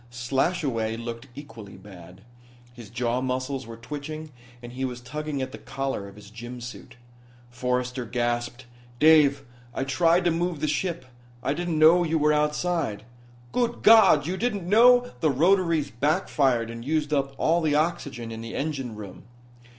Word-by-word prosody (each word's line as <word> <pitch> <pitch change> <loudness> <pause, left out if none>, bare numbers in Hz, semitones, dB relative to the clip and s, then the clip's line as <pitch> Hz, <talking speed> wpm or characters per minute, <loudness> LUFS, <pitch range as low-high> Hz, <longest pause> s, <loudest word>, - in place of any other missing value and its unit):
Slashaway 120 -2 -1
looked 115 +1 -7
equally 115 -8 -11
bad. 90 -2 -14 0.5
His 120 -4 -12
jaw 120 +1 -1
muscles 130 0 -3
were 115 0 -9
twitching 150 +5 -7 0.3
and 120 0 -10
he 130 +2 -5
was 125 -2 -3
tugging 140 +2 -4
at 130 - -6
the - - -9
collar 135 -7 -4
of 100 - -13
his 105 0 -14
gym 120 +3 -8
suit. 120 +1 -10 0.6
Forrester 125 +1 -2
gasped: 120 +1 -2 0.3
"Dave, 150 -1 +5 0.3
I - - -1
tried 165 +7 +2
to 175 - +3
move 170 -1 -1
the 155 - -1
ship. 155 -2 -2 0.4
I 140 - 0
didn't 170 0 -2
know 165 +3 +6
you 165 -1 0
were 150 0 +3
outside." 150 -6 -1 0.5
"Good 240 -1 -1
God, 220 -10 +7
you 180 +4 -2
didn't 205 -5 -2
know 245 +4 +6
" - - -24
"The 160 - +3
rotaries 165 +1 +2
backfired 135 -3 +1
and 115 0 -8
used 150 +2 -1
up 135 -1 0
all 170 +2 +2
the 155 -2 +1
oxygen 145 -7 -2
in 110 0 -7
the 115 0 -7
engine 135 -6 -3
room. 100 -3 -10
135 Hz, 165 wpm, -25 LUFS, 120-160 Hz, 0.6 s, God